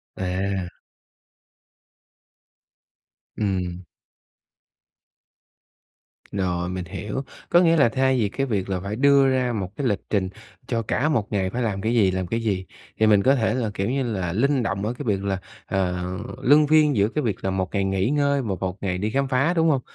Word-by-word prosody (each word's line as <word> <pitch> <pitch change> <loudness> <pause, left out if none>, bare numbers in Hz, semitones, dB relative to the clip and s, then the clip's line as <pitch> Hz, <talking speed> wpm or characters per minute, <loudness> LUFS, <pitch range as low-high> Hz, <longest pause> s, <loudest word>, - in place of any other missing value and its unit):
À! 95 0 -2 2.7
Ừm. 90 -3 -2 2.5
Rồi 90 -3 -1
mình 90 -1 -4
hiểu, 105 +8 -5 0.3
có 175 - +6
nghĩa 165 -1 +4
là 140 -6 +5
thay 130 +1 +2
vì 105 -3 +1
cái 135 +6 -2
việc 100 -6 -2
là 95 -1 -1
phải 100 +3 -4
đưa 140 +2 +5
ra 130 -2 +1
một 95 -5 -3
cái 140 -3 -1
lịch 100 -3 0
trình 95 -3 0 0.4
cho 115 -2 0
cả 130 +7 0
một 115 -10 0
ngày 95 -2 0
phải 125 +5 -3
làm 100 -4 -1
cái 115 +2 0
gì, 100 -5 +4
làm 95 -1 -2
cái 115 +6 -1
gì, 100 -5 -1 0.3
thì 110 - +4
mình 105 -2 +5
có 135 +2 +5
thể 115 -5 +1
là, 120 -4 -1
kiểu 95 +2 -2
như 135 +2 0
là, 95 -8 -2
linh 135 +5 +2
động 100 -2 -2
ở 115 - -1
cái 135 - -7
việc 100 -3 0
là, 95 -1 -1 0.3
ờ, 90 -2 -1 0.4
luân 145 +3 +5
phiên 150 -2 +4
giữa 100 -1 +3
cái 150 - -2
việc 110 -4 -1
là 95 - +1
1 95 -1 -1
ngày 100 - +1
nghỉ 95 +2 0
ngơi 140 -1 +2
và 105 -6 -2
1 95 0 -3
ngày 90 -2 -1
đi 105 +3 -1
khám 140 +4 0
phá, 135 +6 +2
đúng 165 -2 +3
hông? 135 -4 +2
105 Hz, 195 wpm, -24 LUFS, 95-130 Hz, 2.7 s, có